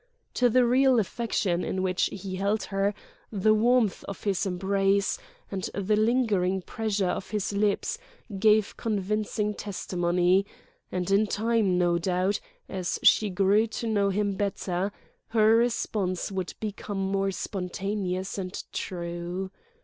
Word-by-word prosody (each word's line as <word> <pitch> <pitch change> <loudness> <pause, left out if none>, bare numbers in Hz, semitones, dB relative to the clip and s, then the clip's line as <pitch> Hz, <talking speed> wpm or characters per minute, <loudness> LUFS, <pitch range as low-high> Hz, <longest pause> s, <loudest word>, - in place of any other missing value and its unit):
To 245 -1 +3
the 250 +1 +4
real 260 +1 +4
affection 200 -4 -1
in 185 0 -2
which 185 -1 +1
he 190 -1 -5
held 200 +3 0
her, 195 +1 0 0.4
the 215 +1 +3
warmth 230 -1 +2
of 200 - -7
his 200 -1 0
embrace, 195 +1 +1 0.3
and 190 -2 -3
the 200 +1 +1
lingering 210 -5 +2
pressure 210 -2 -1
of 185 - -3
his 210 -1 -2
lips 205 0 0 0.4
gave 215 0 +4
convincing 210 0 -1
testimony; 180 -2 +1 0.5
and 180 +1 -2
in 205 +2 +4
time, 215 -3 +1
no 175 -1 +2
doubt, 185 +3 0 0.3
as 185 -2 -2
she 215 - +5
grew 200 +4 +3
to 225 +1 -5
know 205 -3 +2
him 200 +1 0
better, 195 -1 -2 0.4
her 220 0 +4
response 215 -6 0
would 190 -2 -4
become 205 -1 -5
more 195 0 0
spontaneous 190 0 -3
and 185 0 -5
true. 175 +1 -4
200 Hz, 135 wpm, -27 LUFS, 185-215 Hz, 0.5 s, she